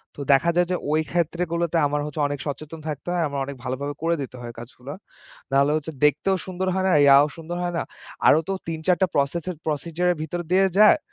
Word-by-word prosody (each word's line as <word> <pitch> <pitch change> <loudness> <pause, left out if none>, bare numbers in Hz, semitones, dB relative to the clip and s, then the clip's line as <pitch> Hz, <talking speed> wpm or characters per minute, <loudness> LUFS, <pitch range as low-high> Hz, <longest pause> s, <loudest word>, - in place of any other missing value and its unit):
তো 145 - -8
দেখা 140 +5 +3
যায় 175 0 +3
যে - - +2 0.2
ওই 155 +1 +3
ক্ষেত্রগুলোতে 170 0 -1
আমার 145 +1 -1
হচ্ছে 150 0 -4
অনেক 145 -1 -4
সচেতন 155 +3 -6
থাকতে 150 0 -5
হয়। 175 -1 +1
আমার 140 -1 -4
অনেক 140 +1 -7
ভালোভাবে 140 +3 -3
করে 170 +1 +2
দিতে 130 -1 -7
হয় 120 -1 -7
কাজগুলো। 125 +3 -10 0.6
না 135 - +1
হলে 140 +1 +3
হচ্ছে 155 +1 -4
দেখতেও 150 +7 +3
সুন্দর 185 0 -3
হয় 190 0 0
না, - - +3
ইয়াও 140 +1 +7
সুন্দর 165 +1 -6
হয় 175 0 -2
না। - - 0 0.4
আরও 155 - +6
তো - - 0 0.2
৩-৪ 165 +2 +1
টা - - +6
প্রসেস 145 +4 0
এর 180 - -6
প্রসেডিয়র 165 +3 -1
এর - - -5
ভিতর 165 +3 -4
দিয়ে 190 +1 +5
যায়। 215 +8 +7
155 Hz, 220 wpm, -24 LUFS, 140-175 Hz, 0.6 s, ইয়াও